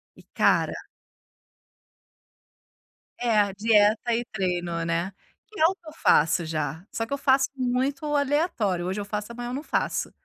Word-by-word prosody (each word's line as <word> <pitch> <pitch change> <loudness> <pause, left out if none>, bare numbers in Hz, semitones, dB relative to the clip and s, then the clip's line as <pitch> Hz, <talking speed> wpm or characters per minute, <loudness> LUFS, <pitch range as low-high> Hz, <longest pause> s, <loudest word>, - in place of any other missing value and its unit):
E - - -17
cara - - +3 2.5
É, 230 -3 +2
a 200 -1 +2
dieta 215 +2 +3
e 240 0 -2
treino, 175 -4 -2
né. 170 +3 -1 0.4
Que 430 - -12
é 315 - +6
o 375 +3 +3
que 340 - -22
eu 310 - -9
faço 165 - +3
já, 155 +1 -3
só 225 - -2
que 280 - -5
eu - - 0
faço 270 0 +3
muito 260 +3 -1
aleatório, 265 - 0
hoje 190 +3 -2
eu 200 - -4
faço 210 +2 -4
amanhã 240 +1 -6
eu - - -5
não 280 - -3
faço. - - -1
220 Hz, 165 wpm, -25 LUFS, 185-270 Hz, 2.5 s, é